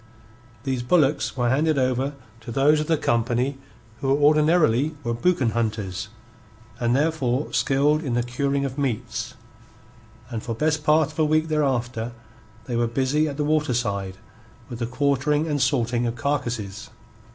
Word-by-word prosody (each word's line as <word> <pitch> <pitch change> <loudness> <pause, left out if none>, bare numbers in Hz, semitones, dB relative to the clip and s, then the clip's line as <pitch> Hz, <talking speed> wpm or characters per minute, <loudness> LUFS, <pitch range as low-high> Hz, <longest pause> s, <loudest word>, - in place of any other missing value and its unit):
These 130 -2 -1
bullocks 145 +1 +2
were 120 -1 +1
handed 155 +3 +2
over 130 +2 0 0.2
to 115 +1 -9
those 145 +5 +4
of 150 - -2
the 160 - +2
company 120 +3 0 0.4
who 135 - -2
ordinarily 150 -1 +3
were 120 -1 -1
boucan 130 -1 +1
hunters, 110 -3 -2 0.7
and 120 0 +1
therefore 140 -3 0
skilled 145 +3 +2
in 125 -5 -2
the 120 - +1
curing 140 +3 -1
of 135 +1 -5
meats, 120 -2 -3 1.0
and 115 -2 -3
for 115 - -4
best 155 +3 0
part 155 0 +3
of 155 - -11
a 155 - +4
week 155 +1 +1
thereafter 125 -6 -1 0.5
they 120 - -3
were 120 0 +1
busy 135 +6 +1
at 140 -2 -5
the 150 - 0
waterside 120 -11 0 0.5
with 120 -2 -7
the 120 - -2
quartering 140 +3 +1
and 145 -3 -1
salting 120 -2 +1
of 115 - -3
carcases. 120 -8 -3
135 Hz, 150 wpm, -24 LUFS, 120-150 Hz, 1.0 s, those